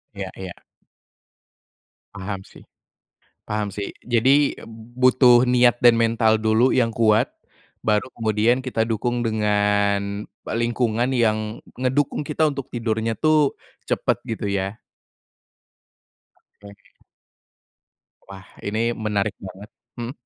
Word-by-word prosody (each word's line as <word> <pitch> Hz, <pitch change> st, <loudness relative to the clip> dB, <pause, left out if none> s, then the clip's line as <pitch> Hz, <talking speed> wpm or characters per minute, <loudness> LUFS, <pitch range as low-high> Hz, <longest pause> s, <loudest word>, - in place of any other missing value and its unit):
Iya -, -, -5 dB
iya. 95 Hz, -2 st, -7 dB, 1.6 s
Paham 100 Hz, 0 st, -5 dB
sih -, -, -16 dB, 0.9 s
paham 105 Hz, -2 st, -2 dB
sih. 100 Hz, +1 st, -4 dB, 0.2 s
Jadi, 135 Hz, +5 st, +3 dB, 0.4 s
butuh 125 Hz, -1 st, +5 dB
niat 120 Hz, -1 st, +4 dB
dan 120 Hz, -1 st, +6 dB
mental 115 Hz, -1 st, +3 dB
dulu 110 Hz, +3 st, +2 dB
yang 115 Hz, -3 st, +1 dB
kuat, 110 Hz, -1 st, +2 dB, 0.5 s
baru 105 Hz, +4 st, 0 dB
kemudian 115 Hz, +2 st, +1 dB
kita 125 Hz, -3 st, -1 dB
dukung 120 Hz, +2 st, -2 dB
dengan 105 Hz, -1 st, 0 dB, 0.2 s
lingkungan 120 Hz, +1 st, 0 dB
yang 110 Hz, -2 st, 0 dB, 0.2 s
ngedukung 130 Hz, +3 st, 0 dB
kita 155 Hz, +1 st, +1 dB
untuk 140 Hz, -2 st, -6 dB
tidurnya 115 Hz, -1 st, -2 dB
tuh, 155 Hz, -2 st, +2 dB, 0.3 s
cepet, -, -, 0 dB
gitu 105 Hz, -3 st, -3 dB
ya? 100 Hz, +1 st, -2 dB, 1.9 s
Oke. 100 Hz, -1 st, -16 dB, 1.3 s
Wah. 95 Hz, -1 st, -12 dB, 0.2 s
Ini 105 Hz, +2 st, -2 dB, 0.2 s
menarik 105 Hz, -1 st, -1 dB
banget 95 Hz, +3 st, -10 dB, 0.3 s
mhm? 120 Hz, +1 st, -4 dB
110 Hz, 105 wpm, -22 LUFS, 105-120 Hz, 1.9 s, dan